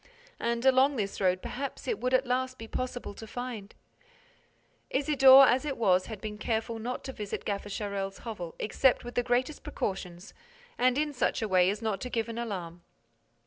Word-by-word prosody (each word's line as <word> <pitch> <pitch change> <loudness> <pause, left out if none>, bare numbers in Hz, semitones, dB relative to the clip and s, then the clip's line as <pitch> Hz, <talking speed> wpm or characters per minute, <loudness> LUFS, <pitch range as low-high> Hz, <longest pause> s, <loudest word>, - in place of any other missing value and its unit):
And, 235 +1 -1
along 265 +2 +5
this 200 -5 -3
road, 185 -1 +2
perhaps 275 +2 -5
it 460 - -1
would 255 +1 +1
at 260 +1 +2
last 255 +1 -1
be 225 - -8
possible 250 -2 -4
to 220 +2 -10
find— 235 -4 -6 1.1
Isidore, 270 -1 +7
as 255 +3 +3
it 290 -3 -3
was, 185 -5 +3
had 220 -3 -7
been 210 0 -6
careful 225 0 -2
not 245 +3 -4
to 265 - -6
visit 210 -4 -5
Gaffer 205 0 -3
Charel's 200 -1 -3
hovel 200 -8 -6
except 255 +4 +2
with 240 0 -7
the 245 - +2
greatest 250 +4 0
precautions 185 -1 -5 0.4
and 255 +1 +2
in 300 0 0
such 250 - 0
a - - 0
way 185 -2 +4
as 210 +3 -3
not 210 -3 -1
to 250 - -4
give 230 -1 -2
an 230 0 -5
alarm. 180 -7 -5
230 Hz, 185 wpm, -29 LUFS, 200-255 Hz, 1.1 s, Isidore